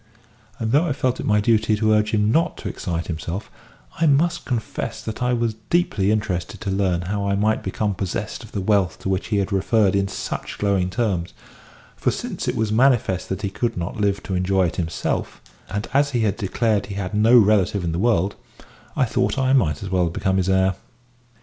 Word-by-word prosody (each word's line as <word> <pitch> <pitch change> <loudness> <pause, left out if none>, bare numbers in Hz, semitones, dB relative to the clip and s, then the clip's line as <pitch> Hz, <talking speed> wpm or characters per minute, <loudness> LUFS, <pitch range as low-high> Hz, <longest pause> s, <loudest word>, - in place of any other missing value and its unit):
And 115 -3 -2
though 150 +6 +3
I 150 - 0
felt 130 -2 -1
it - - -3
my 105 0 +4
duty 110 0 +2
to 110 +1 +1
urge 105 0 +3
him 105 0 +2
not 165 +7 +1
to - - -6
excite 85 -1 -3
himself, 85 +4 -5 0.5
I 165 - +3
must 165 +4 +2
confess 120 -4 -3
that 110 +2 -6
I 125 0 +1
was 115 -2 0 0.2
deeply 110 - +2
interested 105 -5 -1
to 100 -4 -2
learn 95 -3 +1
how 100 +2 -2
I 100 - +1
might 110 +2 +1
become 105 -2 -1
possessed 95 -1 -4
of - - -13
the 100 - -3
wealth 100 -2 +1
to - - -3
which 95 0 -1
he 105 - 0
had 100 +1 -1
referred 100 +1 +2
in 100 0 +1
such - - -5
glowing 100 -3 +1
terms; 95 -5 -1 0.6
for - - 0
since - - -4
it - - 0
was 110 -1 0
manifest 115 -6 +2
that 95 +3 -4
he 100 - -1
could 115 +2 -2
not 90 +4 -4
live 100 -1 0
to 95 - -4
enjoy 95 +1 +2
it 85 - -3
himself, 80 -3 -2 0.3
and 105 +2 -3
as 140 +1 +3
he 120 - +1
had 105 -3 +1
declared 105 0 0
he 100 - -6
had 100 0 -4
no 110 +4 +5
relative 100 -3 +3
in 85 - -1
the 85 - -2
world, 100 -3 +2 0.6
I - - +3
thought 125 +3 0
I 130 0 +2
might 85 - +2
as 95 - -5
well 90 -2 +2
become 95 +3 0
his 95 0 +1
heir. 95 0 +3
105 Hz, 215 wpm, -22 LUFS, 95-115 Hz, 0.6 s, no